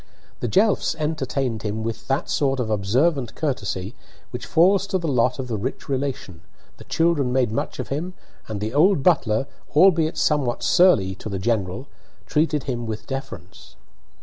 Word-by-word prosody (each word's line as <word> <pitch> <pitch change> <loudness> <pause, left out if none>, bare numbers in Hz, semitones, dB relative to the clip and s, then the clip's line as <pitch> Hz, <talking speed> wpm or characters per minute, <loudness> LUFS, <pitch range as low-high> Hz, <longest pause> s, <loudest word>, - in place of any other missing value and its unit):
The 120 - -2
Jelfs 200 - +2
entertained 135 -7 -2
him 110 +1 -3
with 115 0 -5
that 135 +1 0
sort 135 -2 0
of 115 -3 -2
observant 120 +6 +1
courtesy 105 - -3 0.4
which - - -6
falls 190 +4 +4
to 190 - 0
the 170 -3 -3
lot 125 -3 +2
of 130 -2 -4
the 110 -4 -3
rich 130 +6 -5
relation, 130 -10 -3 0.4
the - - -12
children 165 -6 +1
made 125 -3 +1
much 110 - -3
of - - -5
him, 170 +7 -3 0.3
and 110 -2 -4
the 110 +3 -3
old 160 0 +4
butler, 135 -8 +2 0.3
albeit 165 -1 +4
somewhat 140 -6 +1
surly 115 - +4
"to 95 - -8
the 100 - -3
general," 105 +2 -1 0.4
treated 150 -2 +1
him 120 -3 -3
with 110 -1 -5
deference. 90 - -8
130 Hz, 165 wpm, -23 LUFS, 110-155 Hz, 0.4 s, falls